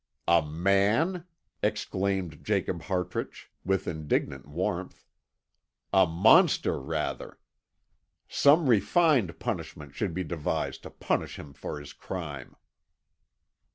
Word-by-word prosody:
"A 85 0 +5
man?" 100 - +1 0.4
exclaimed 95 -5 -1
Jacob 95 -4 -1
Hartrich, 90 +1 -4
with 95 0 0
indignant 75 -4 -2
warmth. 90 +4 -3 0.9
"A 95 -2 +6
monster, 90 +7 +4
rather! 75 +2 -4 0.9
Some 150 +2 +4
refined 125 - +3
punishment 70 -2 -5
should 90 0 -3
be 95 - -1
devised 80 -2 -3
to - - -9
punish - - -2
him 70 - -10
for 75 - -6
his 75 - -10
crime." 75 -8 -7
90 Hz, 100 wpm, -28 LUFS, 80-100 Hz, 0.9 s, A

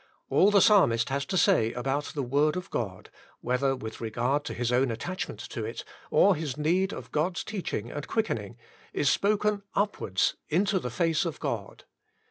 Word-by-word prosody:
All 195 - +5
the 205 -2 +5
Psalmist 115 - +4
has 140 +1 -1
to 190 - -1
say 165 - +3
about 135 +4 -1
the 145 -4 -4
Word 145 +5 +2
of 180 - -6
God, 95 -6 -4 0.3
whether 130 +2 +1
with 110 -4 -8
regard 120 +6 0
to - - -5
his 120 0 -1
own 125 +1 +3
attachment 175 +12 -4
to - - -4
it, - - -5 0.3
or 200 - +5
his 150 -4 -4
need 180 +6 +1
of - - -8
God's 175 +4 0
teaching 180 - -4
and 145 - -5
quickening, 120 - -2 0.4
is 140 - +2
spoken 210 0 +1
upwards 200 - 0
into 195 +4 +2
the 125 - -4
face 165 +8 +1
of 165 -5 -4
God. - - -4
145 Hz, 175 wpm, -28 LUFS, 120-190 Hz, 0.4 s, All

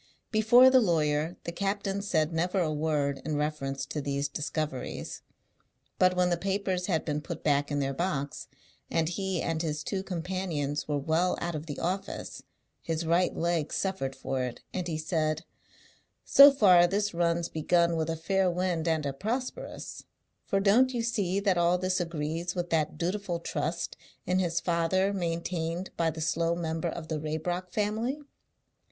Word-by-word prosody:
Before 240 +4 +7
the 260 - +7
lawyer 160 -3 +1
the 170 - -4
captain 200 +1 -2
said 165 -5 0
never 180 +4 0
a 160 -4 +1
word 150 -2 0
in 155 +1 -2
reference 145 -2 -2
to 150 - -4
these 140 0 -1
discoveries. 150 -2 -4 0.8
But 185 0 +4
when 180 -1 +2
the 175 - +2
papers 190 -1 -1
had 165 -5 0
been 150 -1 -1
put - - -7
back 145 -1 +2
in 145 - -1
their 135 -1 0
box, 145 -3 -3 0.4
and 165 -1 +1
he 190 0 -2
and 160 -1 -1
his 155 -2 -2
two 190 +3 -2
companions 175 -6 -3
were 145 -1 0
well 160 +5 +1
out 175 0 -3
of 155 +1 -5
the 145 - -5
office, 195 +3 -3 0.4
his 165 0 -2
right 170 +3 +2
leg 170 -2 0
suffered 190 -9 -2
for 130 0 -3
it, 125 -1 -4
and 180 -2 -2
he 160 -2 -2
said, 155 0 -1 0.8
"So 280 +1 +10
far 185 -9 +6
this 205 +2 0
run's 170 0 +1
begun 170 +2 +2
with 160 -1 -1
a 165 - 0
fair 190 +3 +1
wind 175 -2 -1
and 160 -2 +1
a 140 - -1
prosperous; 235 - -4 0.4
for 195 - +2
don't 240 +6 +4
you 235 - 0
see 200 -5 0
that 195 -3 +2
all 175 +1 +3
this 185 +1 0
agrees 165 +1 -3
with 175 -1 -3
that 155 -2 +1
dutiful 180 0 -2
trust 170 0 -3 0.3
in 180 +1 +1
his 170 -2 +1
father 175 +4 +1
maintained 170 0 -2
by 165 -1 +1
the 160 0 -6
slow 165 +1 +1
member 165 0 -2
of 160 -1 -6
the 155 -1 -2
Raybrock 160 +4 -3
family?" 220 +7 -1
170 Hz, 170 wpm, -29 LUFS, 155-185 Hz, 0.8 s, So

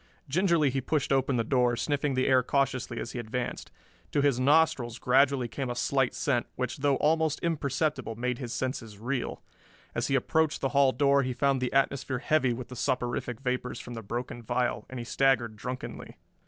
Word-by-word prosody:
Gingerly 165 -2 +2
he 135 +1 -1
pushed 145 +1 0
open 135 -1 +2
the 115 - +1
door, 125 0 +2
sniffing 145 -1 0
the 130 - +2
air 130 -1 +5
cautiously 130 -2 -1
as - - -5
he 125 - -5
advanced. 120 +2 -4 0.4
To 145 - +3
his 140 -4 +3
nostrils 140 -4 +3
gradually 130 0 +3
came 130 +2 -4
a 120 - -3
slight 135 +1 +1
scent, 125 -5 0
which 125 0 -3
though 140 0 +2
almost 160 +1 +1
imperceptible 150 -6 -1
made 125 +1 -2
his 125 -4 -5
senses 120 -5 -4
reel. 125 +4 -3 0.5
As - - -1
he 135 - +1
approached 155 +4 +1
the 135 - 0
hall 140 -1 +4
door 140 0 +3
he 130 -1 -2
found 135 0 +1
the 125 - -1
atmosphere 135 -1 +1
heavy 135 0 +2
with 120 +1 -5
the 125 - -8
soporific 125 -1 -2
vapors 125 -1 -2
from 120 - -8
the 115 - -6
broken 120 +3 -5
vial, 120 +2 -1
and 130 - -7
he 120 - -5
staggered 120 -4 +2
drunkenly. 125 +4 -7
130 Hz, 190 wpm, -28 LUFS, 120-140 Hz, 0.5 s, air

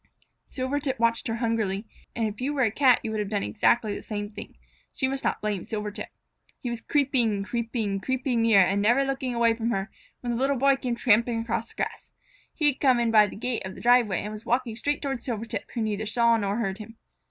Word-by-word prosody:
Silvertip 270 +1 -2
watched 230 0 +1
her 225 - -1
hungrily, 225 -3 -1 0.3
and 225 -1 0
if 210 +2 -7
you 280 +3 -1
were 270 - +2
a 220 - +2
Cat 255 0 +4
you 220 - -3
might 215 - -2
have 205 -2 -2
done 205 -2 -1
exactly 220 0 +2
the - - -6
same 205 -1 -5
thing. - - -10 0.4
So - - -1
you 260 - 0
must 270 0 -4
not - - -1
blame 210 -4 -2
Silvertip. 210 -2 -5 0.5
He 245 - -4
was 235 -1 -5
creeping, 250 -8 +2
creeping, 225 -2 -2
creeping 255 +2 -1
nearer, 225 -4 +6
and 195 +2 +1
never 240 +6 +4
looking 270 -2 -2
away 235 -1 +4
from 230 0 -2
her, 195 -3 -2 0.3
when 240 - -2
the 235 - -1
Little 270 +1 +1
Boy 275 +2 +4
came 250 -3 -3
tramping 235 0 +3
across 230 0 -3
the - - -11
grass. - - -6 0.4
He 310 - -2
had 290 -2 +2
come 255 -3 +4
in 235 -1 +1
by 215 -2 +6
the - - -9
gate 240 +2 -2
of 190 0 -7
the - - -10
driveway, 240 -6 +4
and 210 - -5
was 215 +1 -8
walking 240 -1 0
straight 290 +5 -2
toward 270 -4 -2
Silvertip, 230 -2 -4
who 230 - 0
neither 215 0 -2
saw 235 +1 +3
nor 200 -2 -1
heard 195 -3 -2
him. 225 +1 -10
230 Hz, 230 wpm, -26 LUFS, 210-255 Hz, 0.5 s, nearer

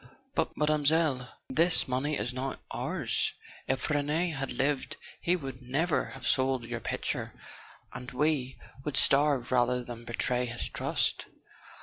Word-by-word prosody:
"But, - - -1
Mademoiselle 150 -3 +2
" - - -50
"This 165 +5 +4
money 130 +4 0
is 115 +4 -2
not 130 +1 -3
ours. - - 0 0.3
If 130 -1 0
Rene 150 +4 +1
had 135 -3 -3
lived 140 0 0 0.2
he 175 - +2
would 135 -6 -6
never 145 +7 0
have 135 -2 -9
sold 130 0 +2
your 120 0 -4
picture; - - -2 0.5
and 125 0 -7
we 135 -1 0 0.3
would 145 -1 -1
starve 140 -3 +4
rather 125 0 +2
than 120 -1 -8
betray 125 +1 0
his 120 0 -3
trust." - - 0
135 Hz, 140 wpm, -30 LUFS, 125-150 Hz, 0.5 s, This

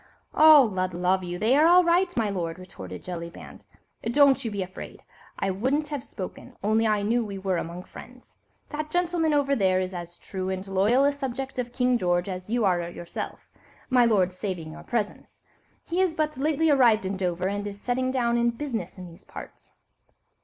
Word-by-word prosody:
"Oh! 310 -2 +8
Lud 185 -1 -2
love 180 +1 +1
you, 175 0 -4
they 220 +7 +3
are 305 +3 +5
all 360 +1 +7
right, 350 +2 +3
my 225 -2 +2
lord," 175 -4 -3
retorted 95 - -9
Jellyband; 170 -1 -8 0.4
"don't 270 +2 +4
you 230 - -2
be 200 -2 -2
afraid. 185 +1 -10 0.3
I 195 - 0
wouldn't 265 +10 -1
have 290 -4 -4
spoken, 185 -4 -8
only 220 +2 +2
I 210 -1 +1
knew 235 +3 +1
we 200 -2 -6
were 190 -1 -1
among 170 +2 -5
friends. - - -14 0.3
That 305 0 -4
gentleman 345 -1 +1
over 280 -1 +2
there 190 -5 +2
is 185 0 -3
as 175 -1 -7
true 190 -1 -5
and 190 +1 -4
loyal 200 +8 +3
a 285 - +4
subject 270 -1 -5
of 245 -1 -3
King 250 -1 +1
George 175 -1 +1
as 185 0 -6
you 235 -1 +1
are 175 -2 +1
yourself, 175 0 -7 0.4
my 250 -1 +5
lord, 195 -6 +3
saving 185 -4 -5
your - - -10
presence. 220 -4 -4 0.5
He 350 +2 0
is 365 -4 +1
but 305 -1 -1
lately 305 +3 +1
arrived 235 -7 +4
in 190 +1 -2
Dover, 180 -1 -1
and 205 +1 -3
is 200 0 -7
settling 255 +3 -1
down 240 -2 +1
in 235 0 +3
business 230 -8 -4
in 185 - -8
these 170 -1 -15
parts." - - -11
215 Hz, 195 wpm, -26 LUFS, 185-270 Hz, 0.5 s, Oh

